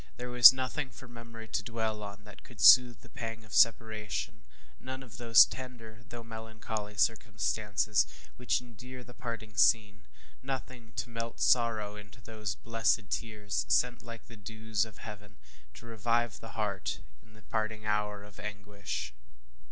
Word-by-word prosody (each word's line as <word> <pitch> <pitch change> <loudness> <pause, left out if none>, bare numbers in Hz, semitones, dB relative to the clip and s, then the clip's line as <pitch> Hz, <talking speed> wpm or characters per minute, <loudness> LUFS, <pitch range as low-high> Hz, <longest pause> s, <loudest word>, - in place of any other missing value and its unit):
There 125 0 -6
was 125 +1 +11
nothing 130 +2 -3
for 125 +1 -13
memory 115 -1 -10
to - - -1
dwell 110 -1 -3
on 100 0 -8
that 105 -1 -14
could - - -16
soothe 125 -2 +7
the - - -16
pang 115 -3 -6
of 110 - -14
separation 110 - +1 0.4
none 130 +1 -7
of 115 -4 -12
those 115 -1 +7
tender, 120 -3 -9
though 120 -1 -8
melancholy 110 -2 -6
circumstances 105 -1 +1 0.3
which 125 0 0
endear 125 +1 -11
the 125 - -14
parting 115 -3 -7
scene 105 -2 +3 0.3
nothing 130 -4 -6
to 120 - -4
melt 115 0 -5
sorrow 110 -4 +2
into 105 +2 -13
those 110 -3 -5
blessed 115 -2 0
tears, 105 -3 -2
sent 125 0 +2
like 115 -1 -10
the 115 - -13
dews 110 0 -2
of 110 -4 -14
heaven, 105 -2 -10 0.4
to - - -13
revive 115 0 -1
the 115 - -11
heart 105 -3 -2 0.2
in 110 - -23
the 110 0 -18
parting 110 -1 -3
hour 105 -1 -1
of 105 -1 -14
anguish. 100 -11 -5
110 Hz, 155 wpm, -31 LUFS, 105-120 Hz, 0.4 s, was